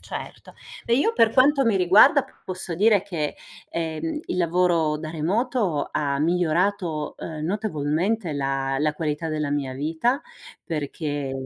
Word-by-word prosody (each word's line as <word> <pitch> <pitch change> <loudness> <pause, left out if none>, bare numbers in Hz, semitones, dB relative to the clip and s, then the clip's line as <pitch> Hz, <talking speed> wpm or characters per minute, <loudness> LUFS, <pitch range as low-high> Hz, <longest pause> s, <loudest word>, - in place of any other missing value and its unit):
Certo. - - -8 0.3
E 235 - +2
io 450 +12 +2
per 225 - +3
quanto 275 +1 +4
mi 220 -4 +3
riguarda, 205 +10 +6 0.2
posso 185 -2 -5
dire 205 +1 +4
che, 165 -7 -3 0.3
ehm, 165 - -3
il - - -3
lavoro 170 -3 +2
da 155 0 -6
remoto 190 - 0
ha 140 -2 -1
migliorato, 170 0 0
ehm, 155 -2 -6
notevolmente 180 0 -1
la 135 -1 -1
la 150 0 +1
qualità 155 +1 -2
della 150 -2 -2
mia 140 -3 -2
vita, 165 - 0 0.4
perché 145 -3 -3
165 Hz, 135 wpm, -24 LUFS, 150-200 Hz, 0.4 s, riguarda